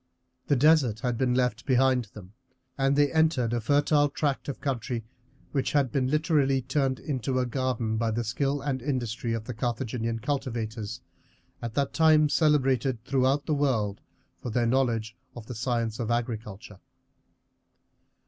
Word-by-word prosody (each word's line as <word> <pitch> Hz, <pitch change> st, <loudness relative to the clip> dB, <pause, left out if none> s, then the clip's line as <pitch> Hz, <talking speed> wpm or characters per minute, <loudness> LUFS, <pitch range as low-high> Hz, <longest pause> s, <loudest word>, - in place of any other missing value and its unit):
The 145 Hz, -, +3 dB
desert 135 Hz, -6 st, +4 dB
had 125 Hz, -2 st, -1 dB
been 125 Hz, +1 st, +1 dB
left 125 Hz, -1 st, 0 dB
behind 130 Hz, -2 st, +2 dB
them, 100 Hz, -1 st, -13 dB, 0.4 s
and 135 Hz, 0 st, +2 dB
they 145 Hz, +1 st, +3 dB
entered 155 Hz, -8 st, +2 dB
a 120 Hz, -, 0 dB
fertile 145 Hz, +3 st, +3 dB
tract 140 Hz, -1 st, -2 dB
of 140 Hz, -, -5 dB
country 125 Hz, -4 st, -3 dB, 0.5 s
which 135 Hz, -3 st, -1 dB
had 140 Hz, -5 st, +2 dB
been 130 Hz, 0 st, +1 dB
literally 150 Hz, -2 st, +2 dB
turned 130 Hz, 0 st, 0 dB
into 130 Hz, -3 st, -2 dB
a 130 Hz, -, +1 dB
garden 120 Hz, -3 st, -1 dB
by 115 Hz, 0 st, 0 dB
the 115 Hz, +2 st, -1 dB
skill 135 Hz, +5 st, -1 dB
and 135 Hz, -2 st, -2 dB
industry 120 Hz, -3 st, -2 dB
of 115 Hz, -1 st, -3 dB
the 125 Hz, -, -6 dB
Carthaginian 115 Hz, 0 st, -2 dB
cultivators, 115 Hz, -5 st, -3 dB, 0.6 s
at 115 Hz, -1 st, -5 dB
that 140 Hz, -1 st, 0 dB
time 155 Hz, -2 st, +5 dB
celebrated 135 Hz, -6 st, +2 dB
throughout 135 Hz, +1 st, +1 dB
the 155 Hz, -, 0 dB
world 115 Hz, -9 st, 0 dB, 0.4 s
for -, -, -4 dB
their 120 Hz, +1 st, +1 dB
knowledge 115 Hz, -3 st, 0 dB, 0.2 s
of 120 Hz, -3 st, -9 dB
the 125 Hz, -, -7 dB
science 115 Hz, -1 st, -2 dB
of 115 Hz, -2 st, -2 dB
agriculture. 115 Hz, -3 st, -4 dB
125 Hz, 155 wpm, -27 LUFS, 115-140 Hz, 0.6 s, time